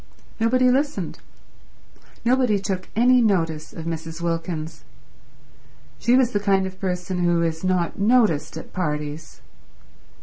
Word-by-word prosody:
Nobody 250 +3 +3
listened. 285 +3 -1 1.1
Nobody 250 -3 +3
took 190 -2 -4
any 250 +2 +5
notice 165 -8 0
of 165 - -8
Mrs. 165 0 -5
Wilkins. 165 -1 -3 1.2
She 240 - +3
was 255 -2 +3
the 205 - 0
kind 195 -2 +2
of 190 0 -8
person 180 -1 -2
who 170 -1 +2
is 160 0 -2
not 185 -1 0
noticed 200 -10 +2
at - - -10
parties. 150 -2 -4
185 Hz, 125 wpm, -23 LUFS, 165-225 Hz, 1.2 s, any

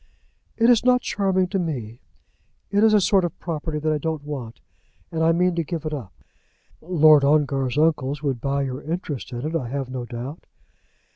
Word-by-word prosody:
"It 230 - +4
is 240 -2 +5
not 250 0 +4
charming 190 -4 0
to 195 - -1
me. 125 -9 -4 0.7
It 205 +1 +3
is 220 - +6
a 210 - +5
sort 195 -1 +3
of 175 - -3
property 160 -2 -4
that 155 +1 0
I 150 - -1
don't 160 0 -3
want, 130 -6 -7 0.5
and 160 - -2
I 165 - +4
mean 180 +2 +2
to 170 0 -1
give 160 0 -5
it 155 - -3
up." 120 -10 -6 0.7
"Lord 155 -4 +5
Ongar's 140 -3 +1
uncles 150 -2 +1
would 135 -5 -1
buy 140 0 0
your 130 0 -4
interest 155 -5 -5
in 120 +2 -5
it, 160 +2 -3
I 130 -8 -2
have 135 -1 -4
no 125 -2 -4
doubt." 125 +6 -7
155 Hz, 195 wpm, -23 LUFS, 135-170 Hz, 0.7 s, is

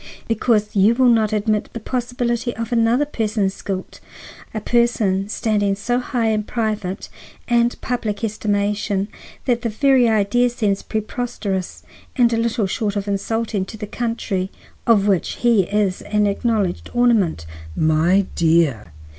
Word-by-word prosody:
Because 215 -2 +1
you 205 +4 +5
will 255 0 +4
not 220 -3 +3
admit 215 0 0
the 230 - -5
possibility 240 0 -2
of 230 0 -5
another 235 +4 +3
person's 215 -7 -1
guilt,—a 195 +2 -8
person 210 -4 +1
standing 205 -3 0
so 245 +5 -1
high 245 -3 -1
in 215 -1 +1
private 210 -4 -3 0.4
and 240 0 +2
public 230 -4 -3
estimation 205 -1 -1 0.4
that 240 -2 +1
the 230 - -1
very 255 +1 +3
idea 220 +3 +2
seems 210 -5 -1
preposterous 215 -4 -4 0.3
and 240 -3 +3
little 230 -1 0
short 205 +2 -2
of 200 0 -2
insulting 210 +1 -1
to 220 - -9
the 210 - -5
country 210 -4 -2 0.4
of 215 -4 +4
which 195 -4 +1
he 230 -6 +3
is 200 -2 0
an 210 0 +1
acknowledged 200 -2 -1
ornament." 220 - +2 0.3
"My 160 +5 +3
dear!" 160 - +2
215 Hz, 135 wpm, -20 LUFS, 200-235 Hz, 0.4 s, you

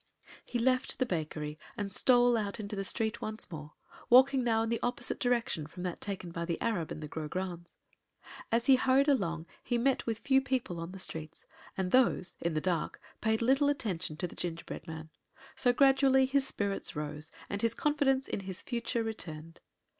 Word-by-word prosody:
He 245 - -3
left 255 +2 +1
the 255 - +2
bakery 155 -5 -3 0.2
and 205 -1 -3
stole 245 +3 +5
out 210 -1 -2
into 210 0 -4
the 195 - -2
street 220 +2 -2
once 215 -3 -4
more, 150 -2 -8 0.4
walking 260 +1 +6
now 225 -2 +2
in 225 - -2
the 230 - 0
opposite 245 0 -1
direction 235 -11 0
from 180 +3 -8
that 180 -2 -4
taken 190 -4 -5
by 170 0 -3
the 170 -1 -2
Arab 205 -9 -1
and - - -5
the - - -4
Grograndes. 175 +3 -5 0.8
As 230 +1 +2
he 265 -1 +7
hurried 265 +2 +3
along 170 - +1 0.2
he 240 - 0
met 260 +2 +1
with 225 -2 0
few 265 +3 +3
people 260 -10 -2
on 165 +1 -5
the 190 - -8
streets; 160 -4 -6 0.3
and 185 -1 -1
these, 240 -8 +4
in 170 -2 -1
the - - +2
dark, 175 -2 -1 0.2
paid 220 +1 +1
little 270 +4 +4
attention 185 - -2
to 180 - -1
the 175 - -7
gingerbread 165 -1 -5
man; 160 -1 -7 0.4
so 245 - +3
gradually 270 0 +5
his 270 0 +1
spirits 200 -7 -2
rose 150 +1 -4 0.2
and 200 0 -3
his 230 0 +1
confidence 275 -3 +2
in - - -2
his 190 -1 -6
future 235 0 -1
returned. 165 -7 -6
215 Hz, 190 wpm, -31 LUFS, 170-250 Hz, 0.8 s, he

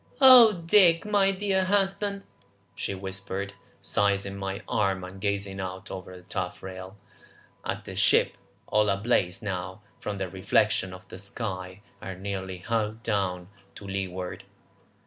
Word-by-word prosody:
"Oh 255 -5 +10
Dick, 170 -2 +5
my 205 -2 +3
dear 190 -1 +1
husband," 200 +1 0 0.5
she 100 - -3
whispered, 95 +1 -5 0.3
seizing 100 -1 +1
my 100 +2 -4
arm 95 -3 +1
and 95 +1 -9
gazing 100 -1 -2
out 95 0 -6
over 95 -1 -7
the 90 - -14
taffrail 95 +1 -6 0.7
at - - -4
the - - -7
ship, - - +4 0.3
all 105 -1 +2
ablaze 100 -2 +1
now 95 -1 -4 0.2
from 105 -1 -4
the 95 -1 -2
reflection 95 +1 +1
of 90 0 -11
the 90 - -9
sky, 95 -2 -5 0.2
and 95 0 -7
nearly 95 -2 -4
hull 110 +3 -1
down 90 -4 -1 0.3
to 100 - -10
leeward. 95 -2 -4
100 Hz, 135 wpm, -27 LUFS, 95-110 Hz, 0.7 s, Oh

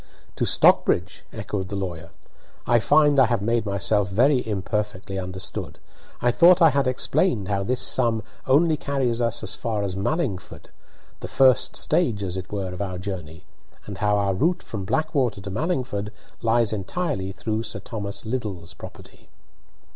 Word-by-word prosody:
"To - - +1
Stockbridge!" - - +3
echoed 95 -2 -5
the 100 - -4
lawyer. 85 -4 -5 0.6
"I 120 - +4
find 145 +5 +4
I 130 - +6
have 115 -3 -1
made 115 0 0
myself 100 +1 0
very 125 +7 +3
imperfectly 100 -1 -3
understood. 95 -1 -5 0.5
I 120 - +4
thought 175 +7 +6
I 165 -3 +6
had 140 -1 +1
explained 125 - +1
how 100 -1 0
this 125 +5 -1
sum 115 -3 +2 0.2
only 155 +4 +4
carries 130 -5 -1
us 115 -1 -1
as - - -1
far 110 -3 -3
as 95 -2 -3
Mallingford, 100 - -3 0.5
the - - -6
first 130 -1 +3
stage, 120 - +1
as 90 -1 -3
it 95 -1 -6
were, 95 -3 -3
of 90 - -6
our 95 -2 -3
journey, 90 -3 -7 0.4
and - - -8
how 105 0 +2
our 100 -1 +1
route 170 - 0
from 100 -4 -6
Blackwater 135 -5 0
to 100 0 -7
Mallingford 125 - -2 0.3
lies 115 -1 +2
entirely 105 - -3
through 110 +3 -3
Sir 110 -1 -5
Thomas 100 -2 -6
Liddell's 105 -8 -4
property." - - -13
110 Hz, 160 wpm, -24 LUFS, 95-130 Hz, 0.6 s, I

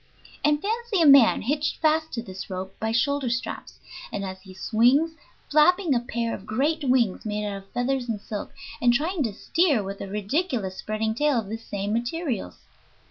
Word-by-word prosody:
And 295 0 +3
fancy 445 +2 -1
a 330 - +5
man 275 -5 +7
hitched 290 +5 -1
fast 315 0 +2
to 230 - -3
this 190 -4 -8
rope 190 0 -5
by 220 0 -1
shoulder 270 +3 +1
straps, 235 +1 -4 0.3
and 200 -2 -3
as 190 0 -7
he 190 0 -13
swings 245 - +3 0.4
flapping 325 +2 +4
a 245 - +3
pair 235 -1 -3
of 200 - -8
great 290 +8 0
wings 250 -7 +2
made 210 -1 -2
of 195 -1 -6
feathers 250 0 -1
and 220 -2 -2
silk, 205 0 -6 0.3
and 245 -1 +5
trying 315 +7 0
to 230 -6 0
steer 295 - +1
with 195 +1 -6
a - - -5
ridiculous 210 - -2
spreading 215 +1 -2
tail 295 +2 +2
of 215 -4 -2
the 220 - -3
same 205 -2 -4
materials. 240 - -2
240 Hz, 185 wpm, -25 LUFS, 210-295 Hz, 0.4 s, man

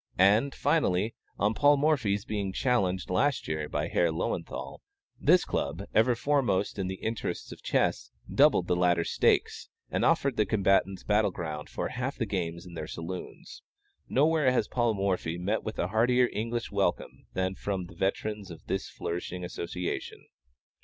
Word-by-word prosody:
And, 105 +9 +4
finally, 115 - +1 0.2
on 105 +2 +2
Paul 145 +5 +5
Morphy's 125 -9 +1
being 100 -4 -2
challenged 95 -8 0
last 135 +7 +1
year 75 -1 -2
by - - -1
Herr 85 - +2
Löwenthal, 80 - -4 0.4
this - - +4
Club, - - -2
ever 120 +2 +4
foremost 115 -7 +1
in 95 - -1
the 95 - -3
interests 110 +3 -4
of - - -10
chess, - - 0 0.2
doubled - - +5
the 90 - +1
latter's 90 -1 +2
stakes, - - +1 0.2
and - - 0
offered 135 -3 +2
the 105 - +2
combatants 95 -2 +2
battle 105 0 +3
ground 80 -4 -5
for - - -3
half 130 +3 -3
the 115 - 0
games 85 -4 -3
in 90 - -11
their 80 -2 -5
saloons. 85 +3 -7 0.5
Nowhere 150 -1 +3
has 120 -4 +1
Paul 120 -3 +1
Morphy 95 -4 -1
met 100 +5 -1
with 110 - -6
a 90 - -1
heartier 125 +4 +3
English 115 +2 -3
welcome - - -1
than 95 0 0
from 95 -2 -3
the 85 - -13
veterans 100 +3 -2
of 85 - -11
this - - -2
flourishing 90 +1 -5
association. 90 0 -5
100 Hz, 160 wpm, -29 LUFS, 90-120 Hz, 0.5 s, Paul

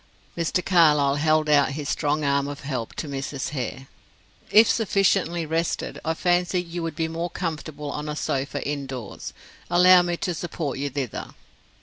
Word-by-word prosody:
Mr. 170 +2 -1
Carlyle 150 -6 +4
held 155 +1 +2
out 145 -2 +4
his 145 0 -5
strong 150 +1 0
arm 140 0 +1
of 145 0 -6
help 130 -5 -4
to 155 - -4
Mrs. 140 -1 -4
Hare. 130 -2 -4 0.6
"If 220 +1 +7
sufficiently 195 -5 +1
rested, 165 +2 -2
I 160 0 -1
fancy 180 +1 +1
you 175 0 -5
would 165 -2 -4
be 160 0 -1
more 165 +2 -3
comfortable 155 -4 -5
on 150 +1 -4
a 150 - -3
sofa 140 -2 -2
indoors. 135 -7 -5 0.4
Allow 180 +1 +7
me 175 -1 -1
to 180 - -2
support 155 -4 -4
you 140 0 -1
thither." 135 -4 -5
155 Hz, 160 wpm, -24 LUFS, 140-175 Hz, 0.6 s, If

